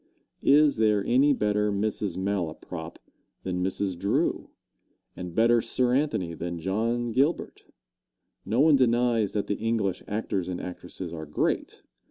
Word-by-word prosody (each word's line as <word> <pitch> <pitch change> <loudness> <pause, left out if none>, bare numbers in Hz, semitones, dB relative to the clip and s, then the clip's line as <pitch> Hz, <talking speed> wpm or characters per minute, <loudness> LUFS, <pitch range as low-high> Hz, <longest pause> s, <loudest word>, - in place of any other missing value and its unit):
Is 145 -1 +5
there 105 -2 +2
any 135 +4 +4
better 105 -4 +1
Mrs. 100 -2 -2
Malaprop 85 -3 -4 0.5
than 90 -1 -2
Mrs. 95 0 -1
Drew, 100 +2 0 0.7
and 90 -1 -7
better 115 +1 +4
Sir 125 +2 0
Anthony 130 - 0
than 85 +1 -5
John 115 +7 -1
Gilbert? 140 +8 0 0.8
No 115 +7 +1
one 155 0 +6
denies 120 -4 +2
that 105 - -1
the 105 - -3
English 110 -4 -1
actors 105 -3 -2
and 90 -1 -4
actresses 90 -1 -7
are 80 -2 -6
great. 75 - -2
105 Hz, 135 wpm, -27 LUFS, 90-120 Hz, 0.8 s, one